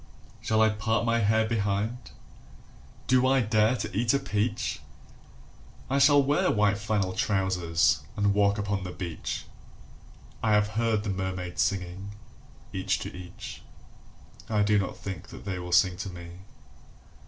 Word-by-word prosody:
Shall 110 0 +2
I 110 - +5
part 110 +2 0
my 115 0 +2
hair 110 +1 +3
behind? 110 +2 -1 1.0
Do 130 0 +3
I 135 0 +4
dare 110 +1 +3
to 120 - -5
eat 115 +5 +2
a - - +2
peach? 110 -3 -1 1.1
I 140 - +3
shall 145 0 +6
wear 145 +2 +2
white 105 -1 +2
flannel 100 -3 -1
trousers, 95 -5 +1 0.2
and 100 -1 +2
walk 100 0 +3
upon 100 -1 -2
the 90 - -5
beach. 90 -2 -5 1.0
I 110 -2 +2
have 105 0 +3
heard 110 -1 0
the 105 - -2
mermaids 95 -2 -3
singing, 95 +1 -2 0.6
each - - 0
to - - -6
each. 90 -1 -9 0.9
I 105 -2 +2
do 105 0 +3
not 95 - -3
think 95 -2 -7
they 95 -2 -6
will 90 0 -6
sing 90 0 +4
to 100 - -5
me. 85 -1 -9
105 Hz, 145 wpm, -27 LUFS, 95-110 Hz, 1.1 s, shall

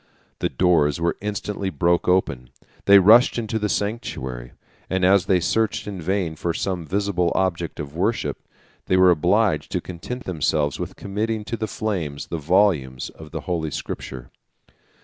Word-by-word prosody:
The - - 0
doors 85 -5 +2
were 85 0 0
instantly 105 -1 -3
broke 85 +2 +1
open; 70 -9 +1 0.4
they 100 0 +8
rushed 110 +7 +6
into 110 -1 -2
the 105 0 -1
sanctuary; 65 - -3 0.4
and 95 -1 +1
as 95 -1 +4
they 95 -2 +4
searched 110 +5 0
in 100 -3 -6
vain 90 -1 -1
for 85 +1 -2
some 90 -4 -3
visible 95 -2 0
object 85 -3 -1
of 75 0 -6
worship, 105 +7 -1 0.5
they 95 - +3
were 95 -1 +6
obliged 90 -1 +2
to - - +1
content 95 +9 -7
themselves 75 -4 0
with - - -5
committing 105 +2 -3
to 115 - -3
the 110 -1 -3
flames 90 -10 -3
the 85 - -3
volumes 75 -7 +1
of 80 -1 -13
the 80 0 -5
holy 85 -3 -2
Scripture. 65 -3 -6
90 Hz, 160 wpm, -23 LUFS, 80-100 Hz, 0.5 s, they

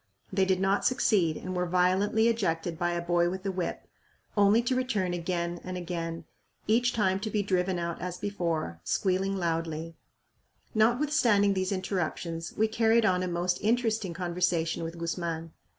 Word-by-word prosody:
They 190 0 +3
did 190 -1 +1
not 195 +1 +2
succeed 195 -10 +2
and 185 - -5
were 180 0 0
violently 185 +5 +2
ejected 170 -7 -1
by 175 -1 +1
a 170 0 -2
boy 175 0 +2
with 190 +2 -6
a 195 - 0
whip; 180 -2 -3 0.5
only 205 +3 +5
to 255 +2 0
return 215 -9 0
again 175 0 -2
and 185 0 -5
again, 165 -2 -4 0.4
each 240 +3 +3
time 190 -5 +1
to 215 +2 -3
be 210 -1 0
driven 185 -1 0
out 170 -1 -3
as 180 -1 -4
before, 165 - -2
squealing 195 - 0
loudly. 165 -2 -2 0.8
Notwithstanding 230 -3 +3
these 185 0 -1
interruptions, 170 -3 -3
we 220 - +3
carried 225 0 +3
on 180 -3 +2
a 185 - -1
most 175 +1 0
interesting 220 -4 0
conversation 175 -2 0
with 165 +1 -5
Guzman. 165 -1 -3
185 Hz, 160 wpm, -29 LUFS, 170-205 Hz, 0.8 s, only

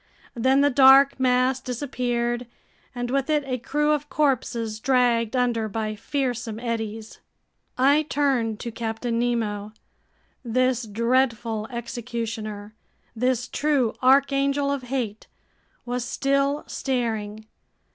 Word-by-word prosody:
Then 260 +4 +3
the 285 0 +4
dark 270 +1 +6
mass 255 0 +2
disappeared, 245 -2 -2 0.5
and 245 0 -3
with 275 +2 0
it 300 -1 +2
a 255 -2 -3
crew 295 +5 0
of 295 0 -1
corpses 235 -6 0
dragged 245 -2 +2
under 235 -3 0
by 215 +1 -3
fearsome 240 -1 -3
eddies.... 225 -2 -4 0.6
I 280 +4 +4
turned 250 -7 0
to 235 - -5
Captain 230 +1 -3
Nemo. 215 -4 -1 0.7
This 250 0 0
dreadful 230 -1 0
executioner, 230 -3 -5 0.4
this 250 +1 0
true 280 -6 +1
archangel 275 +1 +3
of 280 -1 -2
hate, 235 -6 -3 0.6
was 245 0 -2
still 275 +3 0
staring. 220 -5 -3
245 Hz, 110 wpm, -24 LUFS, 225-270 Hz, 0.7 s, dark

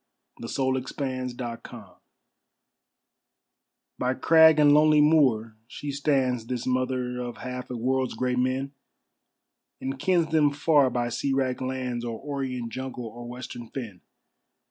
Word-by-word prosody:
The - - -6
World 130 -1 0
Mother 130 -2 -2
(SCOTLAND) 120 -2 -8 2.0
By 125 +1 0
crag 160 0 +6
and 145 -1 +6
lonely 150 0 +5
moor 130 -8 +3
she 145 +3 -6
stands, 135 -5 0
This 125 -1 -3
mother 125 -1 -1
of 120 -1 -6
half 125 0 -6
a 125 - -4
world's 130 +2 0
great 125 +1 0
men, 130 +2 -1 1.1
And 135 0 -4
kens 170 0 +1
them 155 -2 +4
far 145 -2 +3
by 120 -1 -1
sea 135 +3 -1
wracked 130 -2 0
lands, 130 -2 -3
Or 115 -2 -4
orient 130 -4 -4
jungle 130 -2 -5
or 120 +2 -8
western 120 -1 -8
fen. 110 -9 -7
130 Hz, 135 wpm, -26 LUFS, 125-140 Hz, 2.0 s, crag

